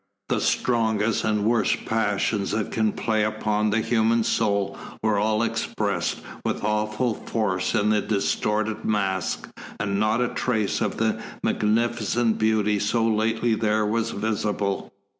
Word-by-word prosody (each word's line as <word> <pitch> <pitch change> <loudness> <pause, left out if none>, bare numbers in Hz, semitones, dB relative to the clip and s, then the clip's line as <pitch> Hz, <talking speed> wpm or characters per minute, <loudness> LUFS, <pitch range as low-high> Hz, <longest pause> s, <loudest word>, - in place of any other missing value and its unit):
The - - +1
strongest 110 -3 +1
and 105 -1 +1
worst 115 +1 +1
passions 105 -2 0
that 105 -1 -2
can 110 -1 +1
play 110 0 0
upon 105 0 0
the 110 +2 +1
human 115 0 +2
soul 100 -3 0 0.3
were 110 -2 +2
all 110 +1 +1
expressed 105 -5 -1 0.2
with - - -2
awful 105 +3 0
force 95 -5 -1
in 105 +1 +2
the 105 -1 +3
distorted 105 +1 -1
mask, 95 -4 -1 0.3
and 100 -1 -1
not 110 +2 +2
a 125 0 +1
trace 110 -5 -1
of 105 -3 -1
the 110 0 0 0.2
magnificent 115 +1 +1
beauty 105 -1 +2
so 115 +3 +1
lately 110 +1 +1
there 110 -1 +1
was 115 +2 0
visible. 105 -2 -2
110 Hz, 140 wpm, -24 LUFS, 105-110 Hz, 0.3 s, the